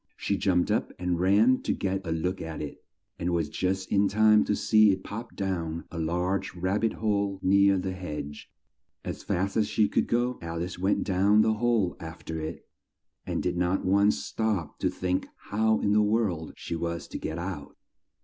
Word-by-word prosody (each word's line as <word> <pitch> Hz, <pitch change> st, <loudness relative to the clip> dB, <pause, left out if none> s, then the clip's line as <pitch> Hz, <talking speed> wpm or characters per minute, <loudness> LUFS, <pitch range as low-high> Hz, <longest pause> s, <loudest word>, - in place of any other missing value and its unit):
She 100 Hz, -, -1 dB
jumped 90 Hz, -2 st, +1 dB
up -, -, 0 dB
and 90 Hz, -1 st, -1 dB
ran 105 Hz, +8 st, +4 dB
to -, -, 0 dB
get 95 Hz, 0 st, -2 dB
a -, -, -1 dB
look 90 Hz, +4 st, -1 dB
at 80 Hz, -1 st, -5 dB
it, 75 Hz, -, -7 dB, 0.4 s
and 85 Hz, -, -1 dB
was 80 Hz, -3 st, 0 dB
just 95 Hz, +3 st, -2 dB
in 100 Hz, 0 st, +4 dB
time 110 Hz, +1 st, +5 dB
to 105 Hz, -, +1 dB
see 110 Hz, -1 st, +5 dB
it 95 Hz, 0 st, -2 dB
pop 115 Hz, +3 st, -7 dB
down 85 Hz, -4 st, -2 dB
a 85 Hz, -, -5 dB
large 90 Hz, +4 st, -1 dB
rab 95 Hz, +4 st, 0 dB
bit 115 Hz, -, +1 dB
hole 100 Hz, -2 st, 0 dB
near 100 Hz, +1 st, +5 dB
the 95 Hz, 0 st, -2 dB
hedge. 75 Hz, -6 st, -6 dB, 0.6 s
As -, -, -5 dB
fast 95 Hz, +3 st, -1 dB
as 110 Hz, -2 st, +2 dB
she 110 Hz, 0 st, +2 dB
could -, -, 0 dB
go, 120 Hz, +1 st, 0 dB
Al 85 Hz, 0 st, -3 dB
ice 90 Hz, 0 st, -6 dB
went 95 Hz, +2 st, +1 dB
down 100 Hz, +3 st, +4 dB
the 110 Hz, 0 st, +3 dB
hole 110 Hz, -5 st, +1 dB
af 80 Hz, 0 st, -9 dB
ter 80 Hz, 0 st, -4 dB
it, 80 Hz, -, -6 dB, 0.6 s
and -, -, -2 dB
did 90 Hz, -1 st, -1 dB
not 90 Hz, +2 st, 0 dB
once 100 Hz, 0 st, +4 dB
stop 100 Hz, +3 st, -2 dB
to -, -, +1 dB
think 90 Hz, 0 st, -2 dB
how 110 Hz, +1 st, +1 dB
in 100 Hz, -, +1 dB
the 105 Hz, -, +5 dB
world 105 Hz, -7 st, 0 dB
she -, -, -5 dB
was 85 Hz, -1 st, -3 dB
to -, -, -5 dB
get 80 Hz, -, -4 dB
out. 85 Hz, -5 st, -6 dB
95 Hz, 195 wpm, -27 LUFS, 85-105 Hz, 0.6 s, time